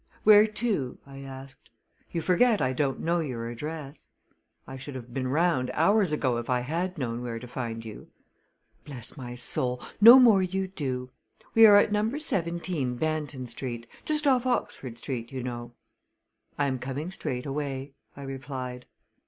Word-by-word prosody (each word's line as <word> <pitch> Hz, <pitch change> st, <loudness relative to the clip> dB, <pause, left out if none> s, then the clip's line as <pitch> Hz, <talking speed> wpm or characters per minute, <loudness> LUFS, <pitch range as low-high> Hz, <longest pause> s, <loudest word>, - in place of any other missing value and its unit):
"Where 210 Hz, 0 st, +8 dB
to?" 210 Hz, -, -2 dB
I 135 Hz, 0 st, -11 dB
asked. 135 Hz, 0 st, -11 dB, 0.4 s
"You 165 Hz, -, -2 dB
forget 215 Hz, +4 st, +3 dB
I 130 Hz, -1 st, +1 dB
don't 135 Hz, 0 st, -1 dB
know 170 Hz, +1 st, +1 dB
your 125 Hz, -7 st, -3 dB
address. 150 Hz, +3 st, -7 dB, 0.6 s
I 135 Hz, -, -8 dB
should 135 Hz, +1 st, -8 dB
have 120 Hz, -1 st, -9 dB
been 130 Hz, -1 st, -2 dB
round 150 Hz, -2 st, +1 dB
hours 195 Hz, +2 st, +3 dB
ago 130 Hz, -5 st, 0 dB
if 120 Hz, -, -7 dB
I 125 Hz, -1 st, +2 dB
had 170 Hz, +8 st, -3 dB
known 120 Hz, -4 st, -3 dB
where 120 Hz, -2 st, -4 dB
to 125 Hz, +2 st, -8 dB
find 115 Hz, -2 st, -5 dB
you." 110 Hz, -2 st, -9 dB, 0.8 s
"Bless 125 Hz, -5 st, -5 dB
my 125 Hz, -4 st, -7 dB
soul, 125 Hz, +1 st, 0 dB, 0.2 s
no 235 Hz, +4 st, +11 dB
more 230 Hz, -7 st, +6 dB
you 190 Hz, +1 st, -1 dB
do! 130 Hz, -8 st, -4 dB, 0.4 s
We 225 Hz, 0 st, +9 dB
are 205 Hz, -1 st, +8 dB
at 205 Hz, -, +4 dB
Number 215 Hz, +6 st, 0 dB
17, 170 Hz, -, -2 dB
Banton 150 Hz, -3 st, -2 dB
Street 120 Hz, -2 st, -5 dB, 0.2 s
just 300 Hz, -1 st, +1 dB
off 260 Hz, -2 st, +3 dB
Oxford 130 Hz, -, -2 dB
Street, 120 Hz, -1 st, -5 dB
you 130 Hz, -2 st, -5 dB
know." 120 Hz, -1 st, -6 dB, 0.8 s
"I 145 Hz, -, +1 dB
am 130 Hz, -2 st, -1 dB
coming 135 Hz, +7 st, -4 dB
straightaway," 135 Hz, -2 st, -4 dB, 0.2 s
I 140 Hz, -, -8 dB
replied. 130 Hz, -2 st, -6 dB
135 Hz, 160 wpm, -27 LUFS, 125-180 Hz, 0.8 s, no